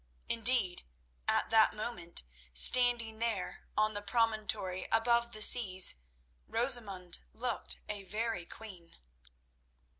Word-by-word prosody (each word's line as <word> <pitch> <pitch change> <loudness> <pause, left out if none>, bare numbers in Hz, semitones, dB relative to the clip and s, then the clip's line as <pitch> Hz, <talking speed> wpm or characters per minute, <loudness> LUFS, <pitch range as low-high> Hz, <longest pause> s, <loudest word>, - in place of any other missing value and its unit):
Indeed, 230 -6 +2 0.5
at - - 0
that 220 -1 +3
moment, 210 - -5 0.3
standing 230 - +4
there 225 -5 -5
on 215 0 0
the 205 - -6
promontory 210 -4 -2
above 235 +1 0
the 215 -2 +2
seas, 190 -7 +6 0.5
Rosamund 220 -7 0
looked 245 -1 -5
a 205 -1 -6
very 215 -1 -5
queen. 185 -6 -13
220 Hz, 100 wpm, -30 LUFS, 190-235 Hz, 0.5 s, seas